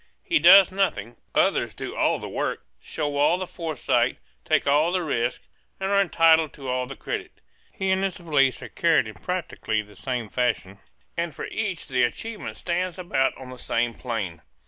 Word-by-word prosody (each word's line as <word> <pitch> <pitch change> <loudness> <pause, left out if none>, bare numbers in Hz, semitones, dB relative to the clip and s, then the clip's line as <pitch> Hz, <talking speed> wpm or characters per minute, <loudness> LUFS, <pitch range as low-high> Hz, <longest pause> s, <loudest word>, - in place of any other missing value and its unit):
He 335 - +2
does 190 +1 +8
nothing; 120 - -1 0.2
others - - +2
do - - -6
all - - +2
the - - -7
work, - - -3 0.2
show 145 -2 -3
all 150 +5 +4
the 185 - -3
forethought, 165 -6 0 0.3
take - - +2
all 150 +4 +3
the 180 -1 0
risk 120 -5 -1 0.4
and 195 +1 -1
are 200 0 +5
entitled 165 -4 +4
to 135 -2 -9
all 125 0 -1
the 135 - -7
credit. - - -5 0.4
He 190 0 -1
and 190 +1 +1
his 195 0 -1
valise 145 -7 +1
are - - -8
carried 165 -8 +2
in 110 - -8
practically 140 - -3
the 105 0 -18
same 125 +1 -3
fashion; 115 -6 -1 0.4
and 170 -3 -2
for - - -5
each 195 -7 -3
the 130 -1 +1
achievement 215 - -3
stands 180 +1 -2
about 155 -7 0
on 130 -1 -10
the 125 - -10
same 120 0 0
plane. 105 -10 -4
150 Hz, 185 wpm, -25 LUFS, 125-180 Hz, 0.4 s, does